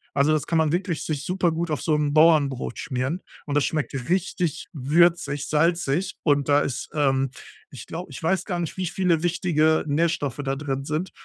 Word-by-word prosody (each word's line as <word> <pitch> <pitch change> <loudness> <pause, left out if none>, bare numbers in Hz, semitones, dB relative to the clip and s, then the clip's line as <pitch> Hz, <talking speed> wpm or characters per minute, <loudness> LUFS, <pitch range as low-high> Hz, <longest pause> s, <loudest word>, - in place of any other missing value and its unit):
Also, 145 +2 +3
das 155 - 0
kann 165 -1 +2
man 155 -2 +2
wirklich 175 -3 -1
sich 150 -2 -3
supergut 170 -3 0
auf 150 - -1
so 155 -2 +1
'n 150 -1 0
Bauernbrot 150 -6 +3
schmieren 130 +6 -2 0.2
und 145 -1 -3
das 145 - +3
schmeckt 155 -3 -2 0.2
richtig 180 -3 -1
würzig, 145 0 +2
salzig 165 +1 +1
und 145 -2 +2
da 145 0 +5
ist 135 -1 -3
ähm, 135 -3 +1 0.4
ich 130 -5 -10
glaube 175 +3 -7
ich - - -8
weiß 185 +2 +1
gar 180 -4 -2
nicht, 170 - -4
wie 185 - -1
viele 175 -2 +1
wichtige 160 -3 +2
Nährstoffe 145 -3 0
da 135 0 -1
drin 135 -1 -3
sind, 155 +5 -2
155 Hz, 185 wpm, -24 LUFS, 145-170 Hz, 0.4 s, da